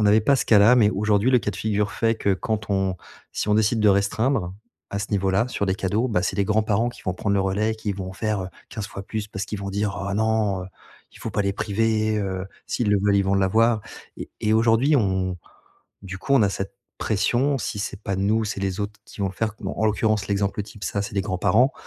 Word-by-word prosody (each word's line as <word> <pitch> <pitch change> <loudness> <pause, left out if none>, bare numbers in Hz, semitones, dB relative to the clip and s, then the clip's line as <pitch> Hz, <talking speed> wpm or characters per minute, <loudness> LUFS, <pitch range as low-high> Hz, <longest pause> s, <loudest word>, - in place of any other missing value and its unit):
on 105 - +3
n'avait 105 +2 +5
pas 140 +6 +3
ce - - -1
cas-là, 110 +3 +6
mais 105 -3 +5
aujourd'hui 105 +3 +1
le 125 - +5
cas 105 - -2
de 100 - -8
figure 105 -1 0
fait 115 0 +1
que 100 - +1
quand 110 +1 -3
on 95 -1 0 0.4
si - - -2
on 105 - +4
décide 110 +1 +2
de 105 - +5
restreindre, 100 0 +1 0.4
à 100 - -2
ce 105 - -4
niveau-là 100 +4 +1
sur 100 -4 -2
des 95 - +1
cadeaux, 105 +6 0
bah, 90 -6 +1
c'est 90 - -1
les 100 - +2
grands-parents 110 +2 +1
qui 120 - -15
vont 90 - 0
prendre 100 +2 -1
le 100 - +2
relais 100 +3 0
et - - -4
qui 105 -2 -3
vont 95 -1 -6
faire, 105 -1 -2
heu, 90 - -5 0.2
15 105 -2 -5
fois 100 - -7
plus, 110 +1 -4
parce 95 +1 -4
qu'ils 105 - -5
vont 100 - -4
dire: 100 0 -1
«Oh 100 - -2
non, 110 -3 +1
heu, - - -7 0.5
il - - -15
faut - - -5
pas 105 - 0
les 100 - 0
priver, 110 +1 0
heu, 95 -2 -3 0.2
s'ils 115 -4 -1
le 105 - +4
veulent 100 -1 +3
ils 100 - +4
vont 95 +1 +1
l'avoir» 110 +4 +3 0.4
et - - -7
et 105 - +1
aujourd'hui 115 +6 +4
on 95 -5 0 0.7
du 95 -1 -6
coup 140 - -2
on 130 - +5
a 100 - +4
cette 100 +3 -5 0.2
pression 125 +6 +1
si 105 - -4
c'est 100 0 -5
pas 100 - -2
nous, 110 +3 +1
c'est 100 -2 -4
les 95 0 -2
autres 105 0 -5
qui - - -12
vont - - +2
le 95 - -9
faire. 110 +1 -2
Bon, 95 - -4
en 110 - 0
l'occurrence 105 -1 +1
l'exemple 100 0 0
type, 105 0 -10
ça 100 - -1
c'est 100 - -6
des 100 - +1
grands-parents 100 +6 +2
105 Hz, 250 wpm, -24 LUFS, 100-110 Hz, 0.7 s, cas-là